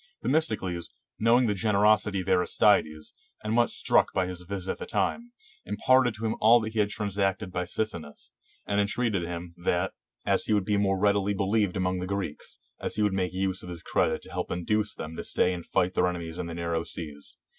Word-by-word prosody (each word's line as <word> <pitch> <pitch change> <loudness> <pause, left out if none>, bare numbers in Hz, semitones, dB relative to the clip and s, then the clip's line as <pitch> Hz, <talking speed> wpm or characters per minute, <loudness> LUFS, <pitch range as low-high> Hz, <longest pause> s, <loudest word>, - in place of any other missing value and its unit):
Themistocles, 105 - 0 0.3
knowing 120 +3 +4
the 105 - +1
generosity 105 -1 +3
of 90 - -9
Aristides, 75 -3 +2 0.3
and 110 +1 -1
much 120 0 +3
struck - - +2
by 95 - +1
his 90 -1 -6
visit 95 +1 -4
at - - -5
that - - -7
time, 240 +1 -1 0.3
imparted 130 -3 +3
to 110 +2 -5
him 110 - 0
all 115 +3 +7
that 110 0 -4
he 110 - -1
had 105 -1 +3
transacted 100 -2 -1
by 90 0 -2
Sicinnus, 85 -6 -5 0.3
and 100 0 +1
entreated 100 -3 0
him, 85 0 -6
that, 90 +1 0 0.3
as - - +1
he - - +1
would 100 -3 +2
be 105 - +1
more 100 -1 +2
readily 100 0 +2
believed 100 0 +1
among 90 0 0
the 90 - -4
Greeks, 100 -6 -3 0.4
he 105 - +1
would 105 -2 +2
make 95 -2 0
use 95 0 -1
of 90 - -9
his 85 -2 -7
credit - - 0
to - - -11
help - - -3
to - - -3
induce 105 +4 -1
them 80 -3 -7
to - - -4
stay 90 - +2
and 85 -2 -7
fight 95 0 +1
their 90 - +2
ene 90 - -3
mies 85 0 -7
in 90 - -3
the 85 - -6
narrow 85 -1 -1
seas. 75 -4 -8
95 Hz, 210 wpm, -27 LUFS, 90-105 Hz, 0.4 s, all